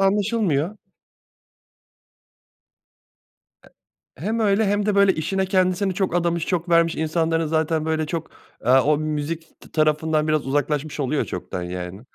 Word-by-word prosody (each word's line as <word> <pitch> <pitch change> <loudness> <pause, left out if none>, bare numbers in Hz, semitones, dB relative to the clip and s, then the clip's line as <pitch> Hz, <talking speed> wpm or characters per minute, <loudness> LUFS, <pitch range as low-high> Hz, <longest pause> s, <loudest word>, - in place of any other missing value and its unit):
anlaşılmıyor. 200 -4 +1 2.9
E - - -16 0.5
hem 220 +5 -1
öyle 210 0 +3
hem 205 +1 +1
de 210 - +1
böyle 200 -1 +5
işine 190 +5 -1
kendisini 185 0 +1
çok 185 -2 -1
adamış, 170 -1 0
çok 175 -1 -2
vermiş 165 -1 +3
insanların 165 +1 0
zaten 160 0 0
böyle 160 -1 0
çok, 160 +1 -4 0.4
eee, 125 - +4
o 150 +2 +3
müzik 155 +2 -4
t - - -16
tarafından 155 0 +1
biraz 155 -3 0
uzaklaşmış 145 +1 -1
oluyor 140 +2 0
çoktan. 90 0 -5
Yani 90 +2 -6
160 Hz, 135 wpm, -23 LUFS, 150-190 Hz, 2.9 s, böyle